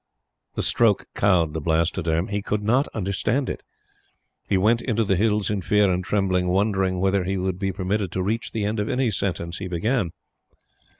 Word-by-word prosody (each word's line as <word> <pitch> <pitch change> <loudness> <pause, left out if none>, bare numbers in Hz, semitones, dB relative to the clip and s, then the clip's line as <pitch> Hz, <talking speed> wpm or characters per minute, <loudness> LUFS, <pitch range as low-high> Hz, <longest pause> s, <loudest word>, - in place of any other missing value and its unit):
The - - -1
stroke 115 -4 +3
cowed 85 -6 +2
the 80 - -3
Blastoderm. 80 +1 0
He 100 0 -1
could 105 +1 -2
not 125 +7 +2
understand 110 +6 -1
it. - - -7 0.9
He 100 - +3
went 110 +5 +3
into 115 -3 0
the 100 -2 +1
Hills 105 0 +1
in 100 -2 -1
fear 105 +1 +3
and 90 +1 -1
trembling, 95 -2 0
wondering 95 -1 +1
whether 95 0 +2
he 95 +2 -2
would 95 -1 -2
be 95 -1 -1
permitted 95 0 -2
to 95 - -1
reach 110 +4 -2
the 110 -2 -2
end 105 +1 -1
of 105 - -1
any 125 -2 +1
sentence 90 -3 -3
he 95 - -4
began. 95 +3 0
95 Hz, 185 wpm, -24 LUFS, 90-105 Hz, 0.9 s, stroke